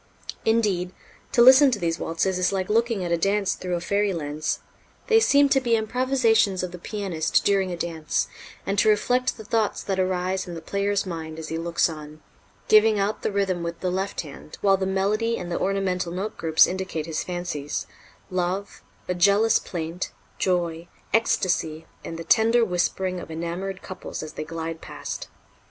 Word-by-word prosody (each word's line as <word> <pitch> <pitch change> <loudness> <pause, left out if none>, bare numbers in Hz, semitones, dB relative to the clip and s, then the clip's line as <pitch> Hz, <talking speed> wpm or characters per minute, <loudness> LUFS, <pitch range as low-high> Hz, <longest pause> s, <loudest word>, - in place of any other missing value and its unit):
Indeed, 205 -6 +1 0.4
to 235 - +5
listen 265 +3 +8
to 240 - 0
these 165 -3 -1
waltzes 180 +3 -1
is 180 - +2
like 190 0 -2
looking 230 -3 +1
at 170 - -3
a 170 - +3
dance 195 +2 +1
through 180 -1 -3
a - - -1
fairy 200 +3 0
lens. 155 -1 -2 0.5
They 450 -2 +5
seem 285 -10 +5
to 270 -1 +3
be 235 -2 +2
improvisations 225 -4 +2
of 180 - -3
the 180 - -9
pianist 185 -5 -1
during 195 -2 +2
a 175 - -4
dance, 165 -2 -1 0.4
and 195 0 0
to 215 - +4
reflect 245 +4 +2
the 220 - -9
thoughts 220 -1 0
that 195 -1 -2
arise 185 0 0
in 175 - -6
the - - -5
player's 200 +2 0
mind 160 -3 -6
as 160 -1 -6
he 160 - -3
looks 170 0 +1
on, 155 -1 -9 0.4
giving 215 0 +6
out 200 +2 -1
the - - -1
rhythm 195 -3 0
with 170 0 -5
the 185 - 0
left 190 +2 -2
hand, 150 -1 -11
while 195 -1 +5
the 190 0 -2
melody 210 +4 0
and 175 -1 -6
the - - -1
ornamental 190 -2 -1
note 190 +5 -4
groups 160 -1 +5
indicate 185 -4 -3
his 160 -1 -3
fancies 175 -5 -4 0.5
love, 185 +2 -2 0.3
a 180 - 0
jealous 200 +5 +4
plaint, 170 0 -5 0.3
joy, 170 -2 0 0.3
ecstasy, 175 -7 +1 0.2
and 165 - -6
the 165 - -6
tender 230 +5 +4
whispering 180 0 -1
of - - -9
enamored 170 +4 -4
couples 185 -3 -7
as 155 - -8
they - - -4
glide 165 +1 -5
past. - - -6
185 Hz, 180 wpm, -25 LUFS, 170-205 Hz, 0.5 s, listen